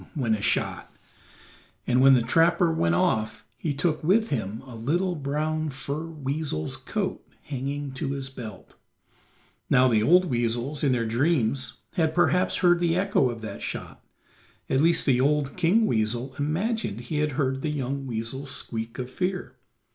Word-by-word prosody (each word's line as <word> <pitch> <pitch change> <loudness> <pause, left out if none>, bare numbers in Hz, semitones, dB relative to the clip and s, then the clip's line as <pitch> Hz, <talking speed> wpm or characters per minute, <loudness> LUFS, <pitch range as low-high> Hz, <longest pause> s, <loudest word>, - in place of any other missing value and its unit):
went 120 -7 +1
a 105 - -6
shot, - - -1 0.9
and 125 +1 +3
when 135 0 +8
the 120 - +2
trapper 165 +6 +3
went 85 - +1
off 110 +5 0
he 155 - -3
took 155 +2 -1
with 220 +7 +3
him 110 -2 -3
a 125 -3 -10
little 170 +11 0
brown 155 +1 -2
fur 140 +3 -4
weasel's 145 - -3
coat - - -3 0.2
hanging 140 +1 -4
to 135 +1 -3
his 135 -1 -3
belt. 115 -7 -10 0.9
Now 130 +1 +5
the 110 -4 +3
old 180 +10 +5
weasels 120 +1 -1
in 140 - +3
their 120 -2 +1
dreams 130 +1 0
had 160 -2 +1
perhaps 175 +1 +3
heard 175 -1 +4
the 170 -1 +1
echo 185 -8 +2
of 115 -2 -6
that 105 -2 -7
shot; - - -6 0.7
at 135 - +3
least 165 +1 +3
the 130 -3 +3
old 145 0 +1
King 185 +6 +3
Weasel 120 - 0
imagined 160 - -1
he 145 +5 -3
had 150 -1 0
heard 135 -1 0
the 155 - -1
young 135 -1 -3
weasel's 120 +4 -4
squeak 115 -2 -3
of 125 - -4
fear. 180 +8 -3
140 Hz, 160 wpm, -26 LUFS, 120-160 Hz, 0.9 s, when